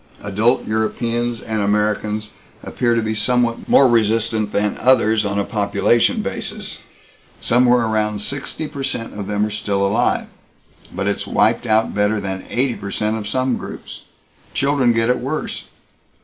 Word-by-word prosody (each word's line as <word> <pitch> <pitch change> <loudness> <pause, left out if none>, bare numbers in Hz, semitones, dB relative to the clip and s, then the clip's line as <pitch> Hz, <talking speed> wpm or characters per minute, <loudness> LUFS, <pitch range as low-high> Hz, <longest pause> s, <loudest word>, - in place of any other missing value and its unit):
Adult 105 +5 +1
Europeans 115 +2 -1
and 110 -1 -2
Americans 105 +1 0 0.3
appear 120 -1 0
to 115 - +1
be 110 0 -1
somewhat 115 +2 0
more 135 - +6
resistant 110 -2 +1
than 105 0 0
others 110 -4 +3
on 100 0 -1
a 100 - +1
population 100 +2 +1
basis. - - -4 0.6
Somewhere 125 0 +3
around 105 -1 0
sixty 140 +7 -5
per 145 -2 -7
cent 130 -4 -3
of 100 -2 -6
them 105 0 0
are 105 - -4
still 100 -1 -1
alive, 100 - +1 0.7
but 100 +2 -3
it's 100 0 -2
wiped 120 - +2
out 110 0 +2
better 105 +1 +1
than 95 -1 -5
eighty 125 0 0
per 100 - -7
cent 105 +2 -1
of 105 -2 -5
some 130 +3 0
groups. - - -9 0.5
Children 140 -3 +2
get 115 +1 +2
it 125 - 0
worse. 135 +5 -4
110 Hz, 155 wpm, -20 LUFS, 105-120 Hz, 0.7 s, more